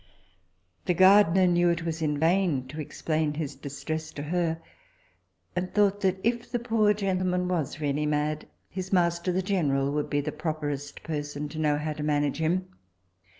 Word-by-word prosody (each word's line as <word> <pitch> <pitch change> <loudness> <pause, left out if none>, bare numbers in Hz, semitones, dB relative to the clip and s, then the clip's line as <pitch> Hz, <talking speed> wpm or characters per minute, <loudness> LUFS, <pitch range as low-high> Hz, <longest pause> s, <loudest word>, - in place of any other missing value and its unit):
The 180 - +1
gardiner 190 0 +6
knew 175 0 +3
it 170 0 -1
was 165 -1 -3
in 150 -2 0
vain 165 -4 +2
to 155 +3 -5
explain 155 0 -1
his 150 -2 -3
distress 155 +3 -5
to 145 - -5
her, 165 +1 0 1.0
and 180 +1 -2
thought 205 -1 +3
that 190 -1 +1
if 235 +1 -1
the 245 - +1
poor 225 -3 +2
gentleman 185 -2 0
was 165 -5 -2
really 150 0 0
mad, 150 +1 -1 0.2
his 185 0 -6
master 175 -1 +2
the 185 +1 0
general 140 -8 +1
would 150 0 -1
be 145 - +1
the 150 +2 -3
properest 145 -3 -4
person 145 -2 -4
to 155 +2 -7
know 150 -2 +2
how 155 +1 -2
to 150 - -7
manage 145 -1 0
him. 180 +4 0
160 Hz, 170 wpm, -27 LUFS, 150-185 Hz, 1.0 s, gardiner